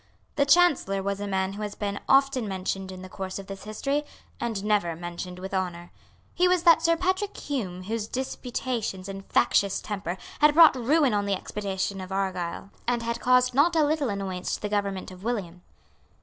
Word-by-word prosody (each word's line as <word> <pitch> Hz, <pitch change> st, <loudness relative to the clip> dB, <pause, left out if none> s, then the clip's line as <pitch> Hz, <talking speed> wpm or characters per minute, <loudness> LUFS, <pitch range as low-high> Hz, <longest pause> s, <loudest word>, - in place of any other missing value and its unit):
The 280 Hz, -1 st, +2 dB
Chancellor 280 Hz, -, +4 dB
was 200 Hz, 0 st, -2 dB
a 205 Hz, -, -3 dB
man 190 Hz, 0 st, -1 dB
who 205 Hz, -, -7 dB
has 210 Hz, -1 st, -4 dB
been 205 Hz, -1 st, -3 dB
often 270 Hz, -3 st, +4 dB
mentioned 190 Hz, 0 st, -3 dB
in 185 Hz, 0 st, -9 dB
the -, -, -7 dB
course 185 Hz, 0 st, -5 dB
of 195 Hz, -, -7 dB
this 195 Hz, 0 st, -9 dB
history, 275 Hz, +7 st, -1 dB, 0.4 s
and 225 Hz, -4 st, -2 dB
never 205 Hz, -6 st, +1 dB
mentioned 175 Hz, +2 st, -6 dB
with 190 Hz, +2 st, -7 dB
honour. 175 Hz, -2 st, -3 dB, 0.4 s
He 360 Hz, -, +3 dB
was 360 Hz, -1 st, +2 dB
that 335 Hz, -2 st, +7 dB
Sir 335 Hz, 0 st, +3 dB
Patrick 375 Hz, +3 st, -1 dB
Hume 190 Hz, -11 st, -4 dB
whose 215 Hz, +2 st, -3 dB
disputatious 245 Hz, -6 st, -3 dB
and 195 Hz, 0 st, -6 dB
factious 200 Hz, -1 st, +2 dB
temper 195 Hz, -4 st, -4 dB, 0.2 s
had 300 Hz, 0 st, +5 dB
brought 330 Hz, -3 st, +8 dB
ruin 270 Hz, +1 st, +3 dB
on 205 Hz, -1 st, 0 dB
the 200 Hz, -, +2 dB
expedition 195 Hz, 0 st, -3 dB
of 185 Hz, 0 st, -8 dB
Argyle, 190 Hz, -1 st, -3 dB, 0.2 s
and 240 Hz, -1 st, +1 dB
had 235 Hz, 0 st, -2 dB
caused 250 Hz, 0 st, +4 dB
not 310 Hz, +6 st, +4 dB
a 315 Hz, -2 st, +4 dB
little 295 Hz, -3 st, 0 dB
annoyance 195 Hz, -3 st, -3 dB
to -, -, -9 dB
the 210 Hz, -, -1 dB
government 200 Hz, -2 st, -2 dB
of 185 Hz, +1 st, -12 dB
William. 195 Hz, -7 st, -3 dB
205 Hz, 190 wpm, -26 LUFS, 190-265 Hz, 0.4 s, brought